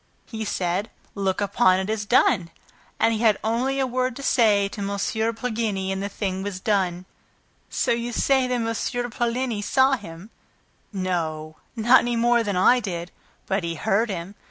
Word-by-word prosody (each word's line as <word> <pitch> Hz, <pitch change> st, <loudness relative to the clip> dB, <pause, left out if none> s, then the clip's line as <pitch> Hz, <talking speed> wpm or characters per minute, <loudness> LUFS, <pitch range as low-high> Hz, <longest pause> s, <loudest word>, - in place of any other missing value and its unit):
He 220 Hz, -2 st, -5 dB
said, 190 Hz, +2 st, -1 dB, 0.2 s
'Look 195 Hz, -1 st, -1 dB
upon 195 Hz, -2 st, +3 dB
it 190 Hz, -, -3 dB
as 215 Hz, -1 st, -2 dB
done.' 180 Hz, -7 st, +3 dB, 0.5 s
And 225 Hz, 0 st, +3 dB
he 220 Hz, -, -2 dB
had 220 Hz, -3 st, +4 dB
only 250 Hz, +5 st, 0 dB
a 265 Hz, -, +2 dB
word 255 Hz, 0 st, -1 dB
to 275 Hz, -, -8 dB
say 210 Hz, -7 st, +3 dB
to 205 Hz, -, -7 dB
M. 200 Hz, -, -2 dB, 0.5 s
Poligny 220 Hz, -5 st, -2 dB
and 190 Hz, 0 st, -2 dB
the 200 Hz, -, -3 dB
thing 190 Hz, -2 st, -3 dB
was 195 Hz, -2 st, -4 dB
done." 185 Hz, -3 st, 0 dB, 0.6 s
"So -, -, 0 dB
you 235 Hz, +1 st, -1 dB
see 265 Hz, +2 st, +2 dB
that -, -, -4 dB
M. 240 Hz, +1 st, -2 dB
Poligny 240 Hz, -2 st, -1 dB
saw 265 Hz, +6 st, +3 dB
him!" 200 Hz, -5 st, -5 dB, 0.6 s
"No, 160 Hz, -5 st, -3 dB, 0.2 s
not 240 Hz, +3 st, +6 dB
any 240 Hz, 0 st, -1 dB
more 235 Hz, +1 st, +3 dB
than 205 Hz, -3 st, -2 dB
I 245 Hz, +7 st, +5 dB
did; 180 Hz, -5 st, -5 dB, 0.3 s
but 195 Hz, -1 st, -1 dB
he 170 Hz, 0 st, -3 dB
heard 220 Hz, +6 st, +1 dB
him. 180 Hz, 0 st, -5 dB
210 Hz, 175 wpm, -24 LUFS, 190-240 Hz, 0.6 s, not